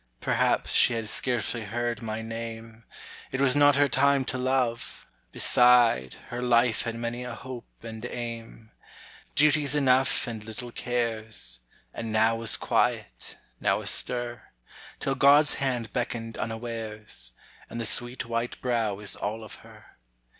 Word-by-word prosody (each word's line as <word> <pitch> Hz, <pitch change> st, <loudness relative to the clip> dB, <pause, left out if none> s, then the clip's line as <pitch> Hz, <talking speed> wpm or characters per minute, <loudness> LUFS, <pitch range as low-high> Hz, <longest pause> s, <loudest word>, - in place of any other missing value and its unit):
Perhaps -, -, +1 dB
she -, -, +5 dB
had 115 Hz, -1 st, -3 dB
scarcely 120 Hz, 0 st, -1 dB
heard 120 Hz, +2 st, -3 dB
my 110 Hz, 0 st, -4 dB
name, 115 Hz, 0 st, -7 dB, 0.5 s
It 130 Hz, -, -3 dB
was 135 Hz, -1 st, +5 dB
not 145 Hz, -1 st, +5 dB
her 145 Hz, 0 st, +4 dB
time 140 Hz, 0 st, +2 dB
to 130 Hz, -, -2 dB
love; 125 Hz, -2 st, -1 dB, 0.3 s
beside, 120 Hz, -, +4 dB
Her 125 Hz, 0 st, -4 dB
life 120 Hz, -2 st, +3 dB
had 115 Hz, -1 st, -4 dB
many 120 Hz, +1 st, -4 dB
a 125 Hz, -1 st, -6 dB
hope 130 Hz, -2 st, -9 dB
and 110 Hz, -1 st, -8 dB
aim, 115 Hz, -2 st, -7 dB, 0.6 s
Duties 150 Hz, -1 st, +4 dB
enough 135 Hz, -3 st, +3 dB
and 115 Hz, -3 st, -6 dB
little 120 Hz, +2 st, -8 dB
cares; 110 Hz, -, -3 dB, 0.3 s
And 115 Hz, -1 st, -5 dB
now 110 Hz, +1 st, +3 dB
was 115 Hz, -1 st, +3 dB
quiet, -, -, -1 dB, 0.2 s
now -, -, +1 dB
astir, 120 Hz, -1 st, -1 dB, 0.5 s
Till 135 Hz, -, -1 dB
God's 145 Hz, +2 st, +5 dB
hand 125 Hz, -5 st, -1 dB
beckoned 115 Hz, -2 st, -3 dB
unawares, 110 Hz, -, -3 dB, 0.4 s
And 115 Hz, -, -6 dB
the 115 Hz, -, -2 dB
sweet 120 Hz, +3 st, 0 dB
white 115 Hz, +1 st, -3 dB
brow 115 Hz, -5 st, -1 dB
is 105 Hz, 0 st, -3 dB
all 110 Hz, +2 st, -4 dB
of 110 Hz, -, -10 dB
her. -, -, -18 dB
115 Hz, 140 wpm, -27 LUFS, 115-125 Hz, 0.6 s, she